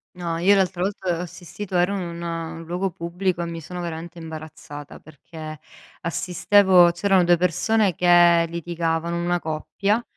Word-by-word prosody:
No, 170 Hz, -2 st, -3 dB
io 195 Hz, +4 st, +5 dB
l'altra 185 Hz, -2 st, 0 dB
volta 190 Hz, -3 st, -1 dB
ho -, -, -2 dB
assistito 180 Hz, +2 st, -7 dB
ero 180 Hz, +3 st, +2 dB
in 190 Hz, -, -2 dB
un 170 Hz, -1 st, -5 dB
luogo 180 Hz, +3 st, -2 dB
pubblico, 175 Hz, +1 st, -2 dB
e -, -, -3 dB
mi 165 Hz, 0 st, -6 dB
sono 180 Hz, +3 st, -7 dB
veramente 170 Hz, 0 st, -6 dB
imbarazzata, 155 Hz, -2 st, -9 dB
perché 155 Hz, 0 st, -10 dB, 0.4 s
assistevo 180 Hz, +2 st, +4 dB
c'erano 185 Hz, +1 st, +2 dB
2 175 Hz, 0 st, +4 dB
persone 185 Hz, +3 st, +2 dB
che 175 Hz, 0 st, +5 dB
litigavano, 170 Hz, 0 st, -2 dB
una 175 Hz, 0 st, +1 dB
coppia, 195 Hz, +8 st, -1 dB
175 Hz, 150 wpm, -23 LUFS, 165-180 Hz, 0.4 s, io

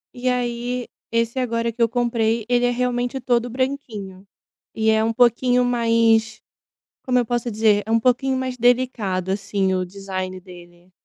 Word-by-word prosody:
E 255 Hz, +1 st, -1 dB
aí, 245 Hz, 0 st, -2 dB, 0.2 s
esse 230 Hz, +2 st, 0 dB
agora 230 Hz, -1 st, -1 dB
que 235 Hz, +1 st, -7 dB
eu 230 Hz, -, +4 dB
comprei, 230 Hz, -2 st, 0 dB
ele 245 Hz, 0 st, +2 dB
é -, -, +3 dB
realmente 245 Hz, +1 st, -1 dB
todo 245 Hz, -1 st, 0 dB
branquinho. 225 Hz, -7 st, -4 dB, 0.5 s
E 220 Hz, 0 st, +2 dB
é 220 Hz, 0 st, +2 dB
um 225 Hz, -, +1 dB
pouquinho 245 Hz, +1 st, +3 dB
mais, 230 Hz, -2 st, +2 dB, 0.7 s
como 250 Hz, -1 st, +2 dB
eu -, -, 0 dB
posso 240 Hz, +1 st, -2 dB
dizer, 210 Hz, -1 st, +2 dB
é -, -, -6 dB
um 230 Hz, -, +4 dB
pouquinho 260 Hz, +2 st, +1 dB
mais 260 Hz, -1 st, -3 dB
delicado, 235 Hz, -7 st, +1 dB
assim, 195 Hz, -1 st, -1 dB
o 185 Hz, 0 st, 0 dB
design 185 Hz, -1 st, -6 dB
dele. 175 Hz, -1 st, -15 dB
230 Hz, 165 wpm, -22 LUFS, 205-245 Hz, 0.7 s, eu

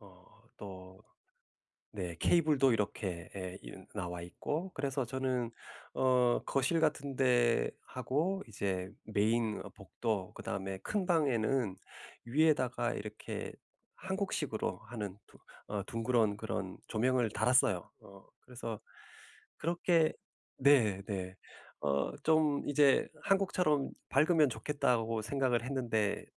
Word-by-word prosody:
어 90 Hz, -3 st, -17 dB, 0.3 s
또 95 Hz, -1 st, -10 dB, 0.9 s
네 90 Hz, -4 st, -4 dB
케이블도 150 Hz, -6 st, +4 dB
이렇게 95 Hz, -5 st, -2 dB
에 95 Hz, -1 st, -5 dB
이 -, -, -9 dB, 0.2 s
나와 90 Hz, -3 st, -4 dB
있고 155 Hz, -, -4 dB
그래서 135 Hz, -1 st, -1 dB
저는 125 Hz, -1 st, -1 dB, 0.4 s
어 125 Hz, -2 st, +3 dB
거실 140 Hz, +5 st, +1 dB
같은 145 Hz, -3 st, 0 dB
데 120 Hz, -3 st, +3 dB, 0.2 s
하고 155 Hz, +10 st, -1 dB
이제 95 Hz, -3 st, -2 dB
메인 110 Hz, +1 st, +1 dB
복도 105 Hz, -6 st, -3 dB
그다음에 95 Hz, 0 st, -4 dB
큰 195 Hz, -, -2 dB
방에는 130 Hz, -, +2 dB, 0.5 s
위에다가 130 Hz, -3 st, +2 dB
이렇게 105 Hz, +1 st, -6 dB, 0.4 s
한국식으로 185 Hz, -, -2 dB
하는 105 Hz, -5 st, -5 dB
두 -, -, -19 dB, 0.3 s
어 105 Hz, -1 st, -2 dB
둥그런 115 Hz, -2 st, +1 dB
그런 -, -, -4 dB
조명을 125 Hz, 0 st, +2 dB
달았어요. 110 Hz, -5 st, +3 dB
어 100 Hz, -1 st, -15 dB, 0.2 s
그래서 115 Hz, -3 st, -6 dB, 0.8 s
그렇게 170 Hz, -1 st, +2 dB, 0.4 s
네 125 Hz, -8 st, +4 dB
네. 95 Hz, -2 st, -4 dB, 0.5 s
어 70 Hz, -1 st, +1 dB
좀 155 Hz, -2 st, +3 dB
이제 145 Hz, -1 st, +4 dB, 0.2 s
'한국처럼 180 Hz, -7 st, +2 dB, 0.2 s
밝으면 155 Hz, +2 st, +5 dB
좋겠다.'고 115 Hz, -2 st, 0 dB
생각을 125 Hz, 0 st, 0 dB
했는데 120 Hz, -6 st, -1 dB
120 Hz, 230 characters per minute, -33 LUFS, 105-140 Hz, 0.9 s, 밝으면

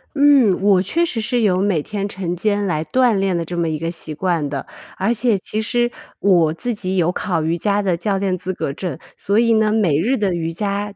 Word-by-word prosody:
嗯， 280 Hz, -9 st, +5 dB
我 200 Hz, -2 st, +4 dB
确 335 Hz, -, 0 dB
实 230 Hz, -8 st, -3 dB
是 240 Hz, +2 st, 0 dB
有 185 Hz, -4 st, +2 dB
每 190 Hz, -7 st, +1 dB
天 205 Hz, +2 st, -4 dB
晨 180 Hz, -3 st, -3 dB
间 205 Hz, +2 st, 0 dB
来 155 Hz, -5 st, -1 dB
锻 245 Hz, +8 st, +2 dB
炼 195 Hz, -3 st, 0 dB
的 170 Hz, -, -2 dB
这 175 Hz, +2 st, -6 dB
么 170 Hz, -1 st, 0 dB
一 155 Hz, -, -2 dB
个 165 Hz, +2 st, -3 dB
习 165 Hz, -2 st, -6 dB
惯 170 Hz, -3 st, -1 dB
的， 140 Hz, -1 st, -4 dB, 0.3 s
而 200 Hz, +5 st, +1 dB
且 235 Hz, -2 st, +1 dB
其 215 Hz, +3 st, -3 dB
实 240 Hz, +2 st, 0 dB, 0.3 s
我 175 Hz, -5 st, +3 dB
自 240 Hz, +9 st, -3 dB
己 190 Hz, -3 st, -3 dB
有 175 Hz, -1 st, +2 dB
考 175 Hz, -4 st, -2 dB
瑜 165 Hz, +2 st, 0 dB
伽 200 Hz, +4 st, +1 dB
的 185 Hz, -3 st, +1 dB
教 195 Hz, +3 st, -1 dB
练 190 Hz, -1 st, 0 dB
资 185 Hz, +1 st, -4 dB
格 145 Hz, -6 st, -3 dB
证， 165 Hz, -2 st, -5 dB, 0.2 s
所 200 Hz, +2 st, 0 dB
以 230 Hz, 0 st, +4 dB
呢， 220 Hz, -1 st, +3 dB
每 200 Hz, -10 st, +2 dB
日 245 Hz, +10 st, +1 dB
的 200 Hz, -5 st, 0 dB
瑜 165 Hz, -1 st, -2 dB
伽 200 Hz, +3 st, -3 dB
195 Hz, 250 characters per minute, -19 LUFS, 170-215 Hz, 0.3 s, 嗯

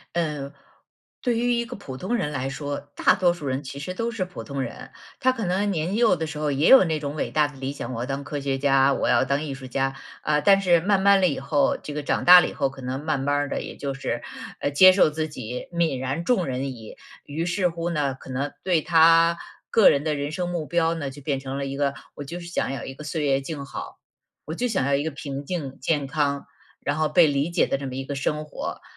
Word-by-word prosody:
嗯， 150 Hz, -4 st, -2 dB, 0.7 s
对 245 Hz, -3 st, 0 dB
于 245 Hz, +1 st, +1 dB
一 235 Hz, 0 st, 0 dB
个 250 Hz, +1 st, -8 dB
普 135 Hz, -10 st, -8 dB
通 190 Hz, -, -2 dB
人 150 Hz, -11 st, -1 dB
来 135 Hz, -1 st, -2 dB
说， 145 Hz, +1 st, -4 dB, 0.2 s
大 -, -, +4 dB
多 180 Hz, -3 st, +3 dB
数 175 Hz, -4 st, -9 dB
人 130 Hz, +2 st, -2 dB
其 140 Hz, +1 st, -7 dB
实 165 Hz, +6 st, -5 dB
都 230 Hz, +5 st, -2 dB
是 220 Hz, -6 st, -2 dB
普 180 Hz, -, -9 dB
通 140 Hz, -2 st, -4 dB
人。 125 Hz, -, -7 dB, 0.3 s
他 260 Hz, -, +4 dB
可 230 Hz, -5 st, -4 dB
能 195 Hz, +3 st, 0 dB
年 175 Hz, +2 st, -1 dB
幼 225 Hz, -4 st, +4 dB
的 160 Hz, 0 st, -3 dB
时 155 Hz, -1 st, -7 dB
候 150 Hz, -1 st, 0 dB
也 140 Hz, +4 st, +2 dB
有 265 Hz, -, +9 dB
那 160 Hz, -3 st, -1 dB
种 145 Hz, 0 st, -4 dB
伟 -, -, -2 dB
大 150 Hz, -1 st, +3 dB
的 145 Hz, -1 st, -13 dB
理 135 Hz, +1 st, -3 dB
想， 130 Hz, -3 st, -6 dB
我 115 Hz, -, -4 dB
要 -, -, -2 dB
当 135 Hz, +2 st, -4 dB
科 145 Hz, 0 st, -4 dB
学 135 Hz, -1 st, -1 dB
家， 135 Hz, 0 st, +3 dB
我 -, -, -1 dB
要 -, -, +4 dB
当 140 Hz, +2 st, 0 dB
艺 145 Hz, -3 st, -4 dB
术 135 Hz, -1 st, -9 dB
家。 135 Hz, +1 st, -1 dB, 0.3 s
啊， 150 Hz, 0 st, +1 dB
但 195 Hz, +2 st, +5 dB
是 175 Hz, -3 st, +4 dB
慢 195 Hz, +2 st, +2 dB
慢 200 Hz, 0 st, +5 dB
了 185 Hz, -, +5 dB
以 140 Hz, -, -3 dB
后， 140 Hz, +1 st, +1 dB
这 150 Hz, -, -7 dB
个 150 Hz, 0 st, -4 dB
长 -, -, -1 dB
大 180 Hz, 0 st, +10 dB
了 -, -, 0 dB
以 -, -, -9 dB
后， 140 Hz, -2 st, 0 dB
可 135 Hz, 0 st, -12 dB
能 130 Hz, +2 st, -4 dB
慢 150 Hz, -4 st, 0 dB
慢 145 Hz, +1 st, 0 dB
儿 145 Hz, 0 st, 0 dB
的 -, -, -2 dB
也 -, -, -8 dB
就 140 Hz, -1 st, -3 dB
是， 120 Hz, -3 st, -3 dB, 0.4 s
呃， -, -, 0 dB
接 185 Hz, +6 st, +8 dB
受 185 Hz, -4 st, +4 dB
自 155 Hz, +1 st, -3 dB
己 125 Hz, -3 st, -7 dB
泯 170 Hz, -5 st, +1 dB
然 135 Hz, +6 st, -3 dB
众 195 Hz, -7 st, +2 dB
人 135 Hz, 0 st, -3 dB
矣， 110 Hz, -3 st, -11 dB, 0.3 s
于 155 Hz, +4 st, -3 dB
是 180 Hz, +1 st, +1 dB
乎 170 Hz, 0 st, -3 dB
呢， 145 Hz, -5 st, 0 dB
可 135 Hz, -, -14 dB
能 135 Hz, +3 st, -3 dB
对 175 Hz, -4 st, +2 dB
他 165 Hz, +1 st, +5 dB, 0.3 s
个 225 Hz, -, +6 dB
人 140 Hz, -, +1 dB
的 155 Hz, -1 st, 0 dB
人 145 Hz, +1 st, -3 dB
生 175 Hz, +1 st, -2 dB
目 170 Hz, -3 st, -3 dB
标 165 Hz, 0 st, +1 dB
呢 150 Hz, -4 st, -4 dB
就 140 Hz, +2 st, -11 dB
变 140 Hz, -1 st, -1 dB
成 135 Hz, 0 st, -5 dB
了 140 Hz, -, -2 dB
一 135 Hz, 0 st, -5 dB
个， 140 Hz, -1 st, +1 dB, 0.2 s
我 145 Hz, -, -6 dB
就 170 Hz, +5 st, -7 dB
是 170 Hz, -, -9 dB
想 175 Hz, -5 st, -2 dB
要 135 Hz, -, -5 dB
一 135 Hz, -, -6 dB
个 145 Hz, -, -10 dB
岁 150 Hz, +1 st, -2 dB
月 135 Hz, -2 st, +2 dB
静 140 Hz, +1 st, -6 dB
好， -, -, -8 dB, 0.5 s
我 155 Hz, -, -5 dB
就 245 Hz, +9 st, -1 dB
想 195 Hz, -, 0 dB
要 140 Hz, -, +1 dB
一 140 Hz, +1 st, +2 dB
个 160 Hz, -, -2 dB
平 140 Hz, -1 st, -6 dB
静 140 Hz, -6 st, -5 dB
健 145 Hz, +1 st, 0 dB
康， 140 Hz, 0 st, -1 dB, 0.3 s
然 145 Hz, +1 st, -1 dB
后 155 Hz, 0 st, +2 dB
被 160 Hz, +2 st, +5 dB
理 145 Hz, +2 st, 0 dB
解 170 Hz, -, +2 dB
的 -, -, 0 dB
这 140 Hz, -, -6 dB
么 130 Hz, -, -6 dB
一 135 Hz, -, -3 dB
个 140 Hz, +1 st, -5 dB
生 150 Hz, +2 st, -1 dB
活。 150 Hz, -, -6 dB
145 Hz, 290 characters per minute, -24 LUFS, 135-170 Hz, 0.7 s, 大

